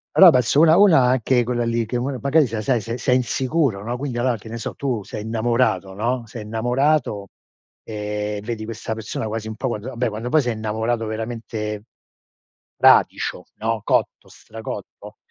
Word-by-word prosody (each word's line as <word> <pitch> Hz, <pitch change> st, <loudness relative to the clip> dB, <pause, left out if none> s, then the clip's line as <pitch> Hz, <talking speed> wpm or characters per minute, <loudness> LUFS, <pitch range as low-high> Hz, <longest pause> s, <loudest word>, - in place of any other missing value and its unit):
Però 185 Hz, -3 st, +9 dB
penso 125 Hz, +2 st, +3 dB
una 160 Hz, 0 st, +7 dB
una 180 Hz, -7 st, +6 dB
anche 125 Hz, 0 st, +2 dB
quella 120 Hz, 0 st, -1 dB
lì 115 Hz, 0 st, 0 dB
che 120 Hz, +2 st, -2 dB
m 130 Hz, +1 st, -2 dB
magari 140 Hz, +1 st, +3 dB
sei 110 Hz, -1 st, -4 dB
sei 120 Hz, -2 st, +1 dB
sei 115 Hz, +2 st, -4 dB
sei 125 Hz, +1 st, +2 dB
insicuro, 130 Hz, -3 st, 0 dB
no? 120 Hz, +2 st, -3 dB
Quindi 130 Hz, -2 st, -4 dB
allora 120 Hz, -1 st, +1 dB
che 110 Hz, +2 st, -12 dB
ne 115 Hz, -, -5 dB
so -, -, -5 dB
tu 125 Hz, -7 st, -2 dB
sei 105 Hz, -, -7 dB
innamorato, 110 Hz, -4 st, 0 dB
no? 120 Hz, +4 st, -2 dB
Sei 115 Hz, 0 st, -8 dB
innamorato, 115 Hz, -1 st, 0 dB, 0.5 s
ehm, 105 Hz, -1 st, -4 dB
vedi 110 Hz, 0 st, -5 dB
questa 115 Hz, 0 st, -5 dB
persona 110 Hz, 0 st, -4 dB
quasi 110 Hz, 0 st, -4 dB
un 110 Hz, -, -5 dB
po' 130 Hz, -, -3 dB
quand 110 Hz, -2 st, -4 dB
vabbè 125 Hz, -2 st, -1 dB
quando 110 Hz, +3 st, -5 dB
poi 155 Hz, +1 st, +4 dB
sei 120 Hz, -2 st, -1 dB
innamorato 110 Hz, +2 st, -2 dB
veramente 110 Hz, -1 st, -4 dB, 0.9 s
fradicio, -, -, +3 dB
no? 110 Hz, -1 st, -2 dB
Cotto, -, -, 0 dB
stracotto, 110 Hz, 0 st, -9 dB
115 Hz, 175 wpm, -22 LUFS, 110-125 Hz, 0.9 s, Però